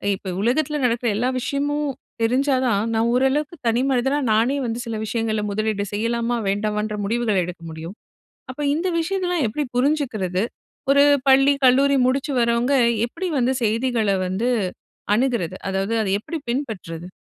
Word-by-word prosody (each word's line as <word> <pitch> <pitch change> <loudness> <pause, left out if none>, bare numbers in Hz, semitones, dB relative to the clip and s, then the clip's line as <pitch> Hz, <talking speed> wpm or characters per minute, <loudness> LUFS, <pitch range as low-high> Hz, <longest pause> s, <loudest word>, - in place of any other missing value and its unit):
இப்ப 190 -1 -6
உலகத்தில 290 +7 +1
நடக்கிற 240 0 0
எல்லா 245 +4 +1
விஷயமும் 290 +3 -1 0.3
தெரிஞ்சா 260 +4 +2
தான் 210 -5 +2
நான் 225 +1 +2
ஓரளவுக்கு 275 +5 +1
தனி 230 +2 +2
மனிதனா 265 +2 +1
நானே 230 +6 +2
வந்து 230 0 -3
சில 230 -1 -4
விஷயங்களை 220 -1 -1
முதலீடு 215 -1 -1
செய்யலாமா 230 +3 0
வேண்டாமான்ற 210 +1 -1
முடிவுகள 225 -1 0
எடுக்க 175 -1 -8
முடியும். 160 +4 -8 0.5
அப்ப 255 +3 -6
இந்த 335 +5 -1
விஷயங்கள்லாம் 355 -3 0
எப்படி 265 +8 -2
புரிஞ்சுக்கிறது? 245 - 0 0.5
ஒரு 280 0 +6 0.2
பள்ளி 270 +1 +6
கல்லூரி 275 +2 +5
முடிச்சு 275 +3 0
வரவங்க 235 +3 +2 0.3
எப்படி 370 +9 -4
வந்து 255 +1 +2
செய்திகள 225 0 +1 0.2
வந்து 195 +7 -1 0.7
அணுகுறது? 235 -8 0
அதாவது 195 +3 -1
அதை 195 - -1
எப்படி 325 +10 -5
பின்பற்றுறது? 210 - -4
240 Hz, 140 wpm, -22 LUFS, 215-275 Hz, 0.7 s, ஒரு